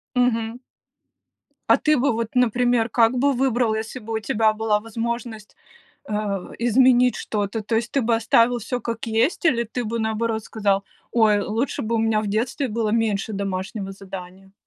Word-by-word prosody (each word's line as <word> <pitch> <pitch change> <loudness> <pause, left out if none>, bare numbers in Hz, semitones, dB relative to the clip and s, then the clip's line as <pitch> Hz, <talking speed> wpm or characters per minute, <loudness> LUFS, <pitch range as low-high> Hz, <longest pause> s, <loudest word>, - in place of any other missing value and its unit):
Мгм. 240 -1 +1 1.1
А - - +6
ты 305 -1 +2
бы 275 +2 +2
вот, 230 0 -2
например, 245 -1 +2
как 230 +2 +3
бы 280 +2 +3
выбрал, 245 -3 +1
если 225 +3 -5
бы 225 0 -7
у 220 - 0
тебя 215 0 +1
была 215 -1 +1
возможность, 225 0 -5 0.5
э, - - -5 0.5
изменить 250 +1 +4
что-то, 210 +1 -3
то 225 +2 -1
есть 230 +1 -2
ты 275 - +1
бы 230 0 +2
оставил 230 +2 +3
всё 245 +3 -4
как 230 +2 -4
есть, 230 +10 +1
или 235 -7 +3
ты 235 +2 -4
бы 230 +2 -3
наоборот 220 0 -1
сказал: 200 -2 0 0.3
"Ой, 215 -3 +4
лучше 230 +7 -2
бы 230 +1 -2
у - - +2
меня 220 -1 +2
в 215 - -4
детстве 230 +6 -1
было 220 -1 -1
меньше 220 -1 0
домашнего 195 0 -4
задания?" 190 0 -10
225 Hz, 170 wpm, -23 LUFS, 215-240 Hz, 1.1 s, А